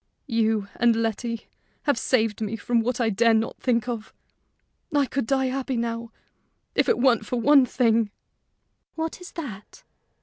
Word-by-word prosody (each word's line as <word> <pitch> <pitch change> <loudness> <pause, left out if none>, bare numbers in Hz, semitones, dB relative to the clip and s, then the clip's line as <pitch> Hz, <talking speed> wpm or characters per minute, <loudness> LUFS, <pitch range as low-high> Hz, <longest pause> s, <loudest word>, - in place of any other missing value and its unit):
"You 220 -4 +1
and 235 -1 +4
Letty 230 +1 -2 0.4
have 285 -2 +2
saved 225 -4 +1
me 215 +1 -2
from 235 +1 +1
what 245 +2 -1
I 225 -2 +2
dare 230 +3 +4
not 220 +1 -1
think 235 -2 +1
of! 230 -3 -5 0.8
I 290 -2 +3
could 265 -2 -2
die 265 +1 +2
happy 260 0 -2
now 230 0 -3 0.6
if - - +2
it - - +3
weren't 240 -3 +3
for 250 - -1
one 275 +1 +6
thing." 230 -3 +2 0.9
"What 320 +2 -4
is 360 - -10
that?" 260 - -8
235 Hz, 160 wpm, -25 LUFS, 225-260 Hz, 0.9 s, one